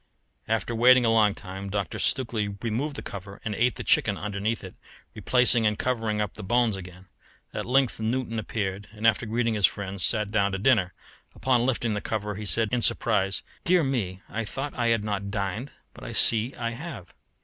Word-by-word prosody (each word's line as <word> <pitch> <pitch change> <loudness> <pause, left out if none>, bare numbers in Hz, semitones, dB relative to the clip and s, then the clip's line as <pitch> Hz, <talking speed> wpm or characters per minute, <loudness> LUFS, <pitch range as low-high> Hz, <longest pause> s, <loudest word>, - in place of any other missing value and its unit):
After 115 +2 -1
waiting 125 +2 +6
a 115 - +3
long 110 -3 +4
time, 95 0 -7
Dr. 100 -4 -3
Stukely 115 -5 0 0.2
removed 125 +6 -2
the - - -6
cover 100 0 -8
and 110 - -2
ate 120 +2 +1
the - - -5
chicken - - +3
underneath 105 +2 -2
it, 95 - -8 0.4
replacing 125 -3 +3
and 105 0 0
covering 115 -4 -1
up 105 -2 -1
the 110 - -8
bones 120 +1 +2
again. 90 0 -10 0.5
At - - -4
length 130 -2 +2
Newton 115 0 -1
appeared, 100 -2 -3
and 110 +1 -5
after 115 +1 +3
greeting 115 +1 0
his 105 -3 +5
friend, 100 -1 -6
sat 105 0 0
down 100 -2 +1
to - - 0
dinner, 95 -4 +3 0.4
but - - -14
on 125 -1 +4
lifting 120 -3 0
the 105 - -2
cover 105 -1 -3
he 105 +1 -6
said 115 +1 +2
in 125 - +2
surprise, 100 -4 +1 0.2
"Dear 180 -1 +4
me, 100 -9 -2
I 115 - -3
thought 135 +7 -5
I 120 -1 0
had 115 -2 +2
not 100 -1 -3
dined, 100 +5 -3 0.2
but - - -13
I 120 -2 -6
see 115 +3 +4
I 115 -1 -3
have." 120 - -8
110 Hz, 200 wpm, -26 LUFS, 100-120 Hz, 0.5 s, waiting